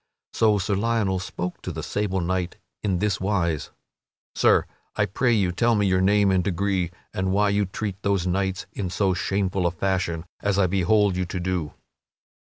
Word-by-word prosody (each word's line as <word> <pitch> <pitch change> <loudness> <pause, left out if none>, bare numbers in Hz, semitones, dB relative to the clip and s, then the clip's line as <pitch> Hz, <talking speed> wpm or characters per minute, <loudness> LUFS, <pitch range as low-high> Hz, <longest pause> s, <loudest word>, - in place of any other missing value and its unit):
So 110 -2 +3
Sir 100 +1 -1
Lionel 100 -2 +1
spoke 90 0 -5
to - - -5
the - - -5
sable 95 -2 -1
knight 90 0 -2 0.2
in 95 -4 0
this 105 +1 0
wise: 90 -6 0 0.6
"Sir, - - +4 0.3
I 105 - +2
pray 120 +5 +1
you 100 -6 +2
tell 115 +6 +2
me 105 -1 +2
your 95 -1 +2
name 100 +1 +4
and 95 -1 +2
degree 95 -1 0 0.2
and 95 0 -1
why 105 +1 +3
you 100 0 +1
treat 100 0 -5
those 100 -3 +1
knights 95 +1 -1
in 95 -3 -3
so 95 +1 +1
shameful 95 0 0
a - - 0
fashion 85 -2 -1 0.2
as 100 -1 +1
I 100 - +4
behold 100 +2 +2
you 90 - 0
to 90 +1 -4
do." 90 -4 -2
95 Hz, 180 wpm, -24 LUFS, 90-100 Hz, 0.6 s, Sir